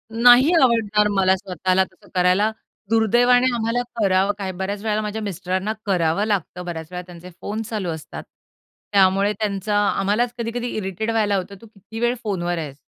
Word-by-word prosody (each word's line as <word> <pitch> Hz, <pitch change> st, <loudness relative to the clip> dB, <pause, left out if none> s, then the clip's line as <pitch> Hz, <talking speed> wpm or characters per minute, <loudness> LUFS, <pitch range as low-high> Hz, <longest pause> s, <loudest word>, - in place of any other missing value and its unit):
नाही 245 Hz, +6 st, +6 dB
आवडणार 215 Hz, -4 st, +3 dB
मला 190 Hz, -1 st, +3 dB
स्वतःला 185 Hz, 0 st, 0 dB
तसं 185 Hz, 0 st, -16 dB
करायला. 185 Hz, +4 st, +3 dB, 0.4 s
दुर्दैवाने 240 Hz, +3 st, +4 dB
आम्हाला 230 Hz, +2 st, 0 dB, 0.2 s
करावं 195 Hz, 0 st, +2 dB
काय 195 Hz, -2 st, -4 dB
बऱ्याच 200 Hz, +2 st, -3 dB
वेळेला 215 Hz, -1 st, 0 dB
माझ्या 215 Hz, +1 st, -4 dB
मिस्टरांना 190 Hz, +1 st, -2 dB
करावं 180 Hz, 0 st, +1 dB
लागतं. 180 Hz, -4 st, -2 dB
बऱ्याच 160 Hz, -2 st, -6 dB
वेळा 180 Hz, 0 st, -5 dB
त्यांचे 175 Hz, 0 st, -11 dB
फोन 215 Hz, +2 st, -4 dB
चालू 210 Hz, -5 st, -3 dB
असतात. 160 Hz, -2 st, -7 dB, 0.7 s
त्यामुळे 195 Hz, +1 st, +3 dB
त्यांचा 205 Hz, -1 st, -1 dB
आम्हालाच 210 Hz, +5 st, 0 dB
कधी-कधी 235 Hz, +1 st, -3 dB
इरिटेट 200 Hz, +2 st, -3 dB
व्हायला 210 Hz, -3 st, +1 dB
होतं. 195 Hz, +2 st, -5 dB
"तू 230 Hz, -, -13 dB
किती 220 Hz, +2 st, -11 dB
वेळ 240 Hz, +1 st, +1 dB
फोनवर 175 Hz, -4 st, -2 dB
आहेस?" 145 Hz, -4 st, -6 dB
200 Hz, 160 wpm, -22 LUFS, 185-220 Hz, 0.7 s, नाही